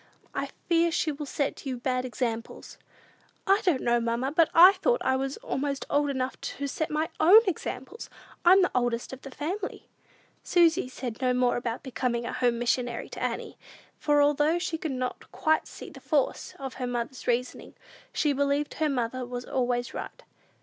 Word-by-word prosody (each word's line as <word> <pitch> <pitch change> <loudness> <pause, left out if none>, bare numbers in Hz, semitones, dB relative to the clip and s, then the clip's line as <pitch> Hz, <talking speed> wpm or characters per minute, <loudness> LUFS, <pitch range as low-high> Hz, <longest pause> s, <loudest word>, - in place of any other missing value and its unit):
I - - -3 0.2
fear 335 0 +3
she 315 -1 0
will 290 0 -6
set 280 0 -2
you 255 -2 -2
bad 255 +1 -1
examples." 235 -2 -4 0.7
"I 395 +2 +4
didn't 355 - +1
know, 240 0 +3
mamma; 235 +3 -1
but 320 +1 +4
I 355 +3 +9
thought - - +1
I 260 - +3
was 270 +1 -2
almost 285 - -3
old 290 0 +2
enough 260 -1 -3
to 280 - -4
set 310 +3 -2
my 310 +1 -1
own 380 +8 +8
examples! 350 - -4 0.3
I'm 370 +2 +7
the 360 - +1
oldest 240 0 -1
of 265 - -9
the 275 - -9
family." 360 +9 -5 0.6
Susy 335 -4 +3
said 250 -2 -6
no 250 -1 +2
more 250 -1 +2
about 240 -1 -3
becoming 245 -3 -2
a - - -4
home 245 -2 +1
missionary 240 0 -1
to - - -8
Annie; - - -3 0.4
for, 290 -1 +3
although 295 +3 +3
she 345 -2 -3
could 315 - -3
not 255 -1 -4
quite 315 -1 +1
see - - -10
the - - -12
force 290 -5 -1
of 270 -1 -6
her 250 - -1
mother's 245 +2 -4
reasoning, 245 +1 -2 0.4
she 295 -3 +1
believed 285 +1 0
her 310 -1 0
mother 255 -1 -2
was 245 0 -6
always 245 -1 -1
right. - - -7
270 Hz, 180 wpm, -27 LUFS, 250-315 Hz, 0.7 s, I